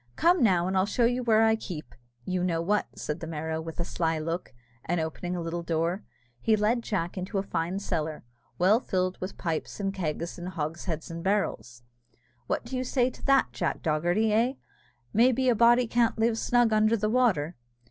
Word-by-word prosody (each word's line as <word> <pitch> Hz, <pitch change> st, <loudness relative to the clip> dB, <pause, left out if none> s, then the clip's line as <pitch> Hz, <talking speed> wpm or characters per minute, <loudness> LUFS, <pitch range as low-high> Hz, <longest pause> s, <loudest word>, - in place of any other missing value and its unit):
"Come 350 Hz, +1 st, +4 dB
now, 185 Hz, -7 st, +4 dB
and 190 Hz, -, -1 dB
I'll 190 Hz, +1 st, +3 dB
show 235 Hz, +3 st, +2 dB
you 245 Hz, +2 st, +1 dB
where 225 Hz, -2 st, +4 dB
I 220 Hz, 0 st, +4 dB
keep 165 Hz, -, -7 dB, 0.3 s
you 185 Hz, -1 st, -1 dB
know 170 Hz, -2 st, 0 dB
what," 205 Hz, +5 st, +1 dB
said 150 Hz, +2 st, -4 dB
the 165 Hz, -, -6 dB
Merrow, 160 Hz, 0 st, -3 dB
with 165 Hz, +1 st, -8 dB
a 170 Hz, -, -1 dB
sly 165 Hz, -2 st, -1 dB
look; 165 Hz, +3 st, -3 dB, 0.3 s
and 175 Hz, +1 st, -1 dB
opening 160 Hz, +3 st, -3 dB
a 175 Hz, -, -3 dB
little 170 Hz, +1 st, -3 dB
door, 170 Hz, +3 st, -1 dB, 0.4 s
he 220 Hz, -, +3 dB
led 215 Hz, +3 st, +1 dB
Jack 190 Hz, -5 st, -2 dB
into 185 Hz, +3 st, -3 dB
a 195 Hz, -, +1 dB
fine 180 Hz, -1 st, -2 dB
cellar, 160 Hz, -6 st, -3 dB, 0.3 s
well 195 Hz, +6 st, +4 dB
filled 185 Hz, -6 st, -2 dB
with 185 Hz, +2 st, -5 dB
pipes, 165 Hz, +2 st, -3 dB
and 195 Hz, -1 st, -1 dB
kegs, 170 Hz, -2 st, -3 dB
and 175 Hz, -, -6 dB
hogsheads, 160 Hz, 0 st, -4 dB
and 165 Hz, 0 st, -6 dB
barrels. 190 Hz, -11 st, -1 dB, 0.6 s
"What -, -, -1 dB
do 250 Hz, +3 st, -5 dB
you 255 Hz, -, -1 dB
say 255 Hz, 0 st, +1 dB
to -, -, -15 dB
that, 275 Hz, -1 st, +4 dB
Jack -, -, -2 dB
Dogherty? 175 Hz, +7 st, +1 dB
Eh! 235 Hz, +4 st, +3 dB, 0.6 s
may 240 Hz, +4 st, +5 dB
be 255 Hz, +1 st, +1 dB
a -, -, +5 dB
body 240 Hz, +2 st, +5 dB
can't 235 Hz, 0 st, +1 dB
live 225 Hz, 0 st, +1 dB
snug 240 Hz, -2 st, +3 dB
under 215 Hz, +1 st, +3 dB
the 215 Hz, 0 st, 0 dB
water?" 210 Hz, -10 st, +2 dB
185 Hz, 200 wpm, -28 LUFS, 165-225 Hz, 0.6 s, may